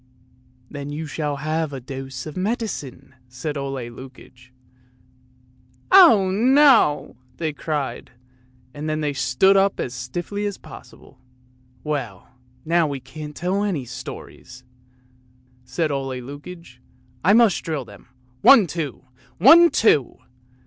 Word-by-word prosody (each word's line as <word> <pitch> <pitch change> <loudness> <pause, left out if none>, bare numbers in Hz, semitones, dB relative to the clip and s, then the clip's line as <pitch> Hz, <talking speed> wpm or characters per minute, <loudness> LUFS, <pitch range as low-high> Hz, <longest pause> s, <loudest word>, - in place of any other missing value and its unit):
" 125 0 -34
" 125 0 -33
Then 145 -1 -7
you 150 +2 -5
shall 150 -1 -3
have 155 +2 -2
a 135 - -6
dose 135 0 -8
of 155 - -8
medicine," 185 - -4 0.2
said 145 +5 -5
Ole 135 -3 -4
Lukoie. 130 0 -14 1.4
"Oh, 275 - +7
no!" 240 - +3 0.2
they 160 -2 -3
cried, 150 -2 -4 0.6
and 150 +1 -5
then 155 0 -2
they 145 -1 -1
stood 140 +9 +2
up 195 0 +2
as 125 - -3
stiffly 175 +12 -4
as 200 - -5
possible. - - -15 0.6
"Well, 130 -11 -5 0.4
now 165 0 +2
we 140 -2 -4
can't 150 +3 -10
tell 190 +4 -1
any 175 -11 -2
stories!" 125 +1 -10 1.0
said 160 +3 -2
Ole 135 -2 -3
Lukoie. 145 +1 -11 0.2
" 125 0 -34
I 195 +5 +4
must 225 -3 +4
drill 155 -6 -4
them! 100 +1 -16 0.3
One, 260 -7 +7
two! 155 -5 -5 0.3
One, 330 - +7
two! 150 - +2
150 Hz, 130 wpm, -22 LUFS, 130-185 Hz, 1.4 s, Oh